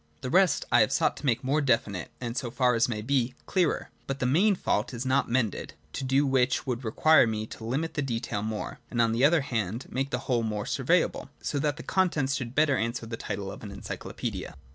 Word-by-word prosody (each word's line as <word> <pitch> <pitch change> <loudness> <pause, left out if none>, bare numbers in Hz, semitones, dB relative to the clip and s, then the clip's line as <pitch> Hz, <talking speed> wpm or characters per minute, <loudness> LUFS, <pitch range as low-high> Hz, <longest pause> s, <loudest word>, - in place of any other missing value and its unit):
The 125 - -4
rest 185 +1 +4
I - - +6
have - - +3
sought - - +2
to - - -7
make 120 -1 +1
more 140 +4 +1
definite, 110 - 0
and 120 -1 -4
so 125 -2 -2
far 125 0 +2
as 115 +1 +2
may 105 -3 -3
be 130 0 0
clearer; 180 -5 0 0.2
but 135 - -2
the 130 - -1
main 190 +11 +4
fault 115 - -1
is 120 +2 -4
not 130 +1 +2
mended 115 -4 -1
— - - -34
to - - -4
do 135 +2 +2
which 130 -1 +2
would 125 -1 -3
require 135 +5 +5
me 110 -1 -2
to 110 - -10
limit 140 +8 -2
the 145 - -1
detail 115 -5 -2
more, 110 0 -4
and 120 - -3
on 115 -1 +4
the 115 +3 +1
other 155 +2 +5
hand 115 -3 -2
make 135 +1 -1
the 125 - -1
whole 125 -3 +1
more 105 -2 -2
surveyable, - - +1
so 145 - -2
that 145 +1 0
the - - -7
contents 155 -8 +1
should 125 -2 -4
better 150 -2 +4
answer 115 +1 -2
the 115 0 -5
title 100 -3 -5
of 100 - -10
an 105 - -7
Encyclopaedia. - - -6
125 Hz, 230 wpm, -28 LUFS, 115-140 Hz, 0.2 s, I